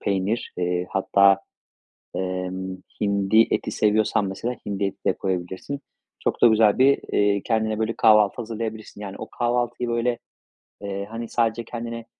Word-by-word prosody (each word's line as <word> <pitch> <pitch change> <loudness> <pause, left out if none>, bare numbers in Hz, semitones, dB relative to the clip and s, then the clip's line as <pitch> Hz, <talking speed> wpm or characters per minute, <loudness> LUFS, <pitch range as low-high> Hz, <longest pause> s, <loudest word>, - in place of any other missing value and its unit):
peynir, 100 +3 -1
eee, 90 0 -1
hatta, 100 0 +4 0.8
emm, 95 0 -3 0.2
hindi 100 +2 +3
eti - - 0
seviyorsan 105 -1 +2
mesela 115 +6 -3
hindi 100 0 -2
eti 95 - -6
de - - +3
koyabilirsin. 95 +9 -3 0.4
Çok - - -2
da - - +9
güzel 110 -2 +4
bir, 140 +1 +5
eee, 100 -1 +3
kendine 110 -1 0
böyle 110 +1 -1
kahvaltı 105 -2 +5
hazırlayabilirsin. 110 -2 -5
Yani, 100 -2 -6
o 110 - -8
kahvaltıyı, 120 0 -1
böyle, 120 0 0 0.6
eee, 100 0 -4
hani, 115 0 -5
sadece 115 0 0
kendine 115 0 -6
105 Hz, 145 wpm, -24 LUFS, 95-115 Hz, 0.8 s, da